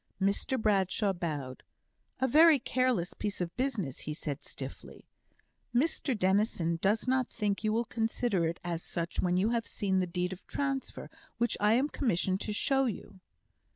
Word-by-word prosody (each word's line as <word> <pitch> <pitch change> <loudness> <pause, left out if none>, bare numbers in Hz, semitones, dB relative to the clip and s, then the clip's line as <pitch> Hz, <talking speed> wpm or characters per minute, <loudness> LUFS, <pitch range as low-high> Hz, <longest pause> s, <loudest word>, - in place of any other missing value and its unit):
Mr 200 +6 0
Bradshaw 200 -1 +2
bowed. 145 -7 -4 0.6
"A 260 - +2
very 310 +4 +7
careless 250 -8 0
piece 205 -1 -3
of 175 -1 -3
business," 230 - -2
he 150 - -5
said, 145 -3 -5
stiffly. - - -9 0.7
"Mr 270 -2 +1
Dennison 185 -4 +1
does 210 +5 +1
not 260 -1 +2
think 205 0 -2
you 215 - +2
will 230 +2 +1
consider 225 -6 0
it 165 - -4
as 170 -1 -2
such 170 0 -3
when 180 0 +2
you 200 +4 +2
have 230 -2 0
seen 190 -2 0
the 185 - 0
deed 180 +1 -2
of 185 - -11
transfer, 275 -1 -3 0.3
which 235 0 +1
I 210 +1 +4
am 260 +5 +3
commissioned 195 - 0
to 215 - -2
show 270 +6 +2
you." 205 -4 -5
205 Hz, 165 wpm, -31 LUFS, 180-245 Hz, 0.7 s, very